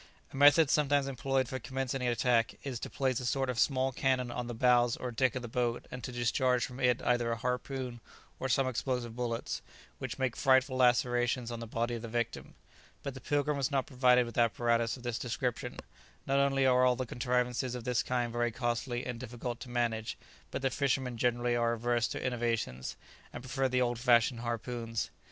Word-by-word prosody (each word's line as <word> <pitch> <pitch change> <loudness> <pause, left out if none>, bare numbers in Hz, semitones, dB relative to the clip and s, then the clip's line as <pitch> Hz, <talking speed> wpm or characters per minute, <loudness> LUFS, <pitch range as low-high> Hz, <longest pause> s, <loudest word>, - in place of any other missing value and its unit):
A - - -8
method 145 +2 +6
sometimes 145 -2 +3
employed 135 -1 0
for 130 +1 -4
commencing 130 +1 -3
an 125 - 0
attack 120 -1 +2
is 130 -4 -4
to - - -5
place 130 -3 0
a - - -6
sort 135 0 0
of 120 - -4
small 135 -1 +2
cannon 130 -1 0
on 120 0 -4
the 120 - -5
bows 120 0 +3
or 125 - -4
deck 130 +1 +1
of 130 - -3
the - - -4
boat 120 0 -1
and 125 -1 -7
to 125 - -4
discharge 125 +1 +1
from 125 0 -9
it 125 -1 +2
either 120 -1 +1
a - - 0
harpoon 125 0 -3 0.4
or 130 - -2
some 130 +1 +2
explosive 125 -2 -2
bullets, 120 -1 -3 0.4
which - - -5
make 130 -3 -1
frightful 130 0 +3
lacerations 120 -1 +2
on 120 - -5
the 115 - -6
body 115 +2 -1
of 115 - -4
the 115 - -6
victim; 120 0 -3 0.5
but 140 - -4
the 130 - -10
"Pilgrim" 145 0 0
was 135 -3 0
not 135 -3 0
provided 125 -1 +4
with 115 0 -4
apparatus 115 +1 +2
of 125 - -13
this 120 -2 -2
description; 125 0 -3 0.5
not 135 +1 +2
only 135 -1 +3
are 125 -1 +5
all 125 -1 +4
the 130 - -3
contrivances 125 +1 -1
of 125 - -6
this 125 -1 +1
kind 120 -2 -1
very 120 0 +1
costly 120 +1 -2
and 125 -2 -4
difficult 120 -1 -5
to 125 - -9
manage, 115 -2 -1 0.3
but - - -5
the 135 - +2
fishermen 130 -2 0
generally 120 +1 +1
are 120 0 +2
averse 120 0 +1
to - - -4
innovations, 115 - -2 0.4
and - - -8
prefer 130 +1 0
the 125 0 +2
old 120 -1 -1
fashioned 120 -1 +4
harpoons. 115 -1 -3
125 Hz, 205 wpm, -31 LUFS, 120-130 Hz, 0.5 s, method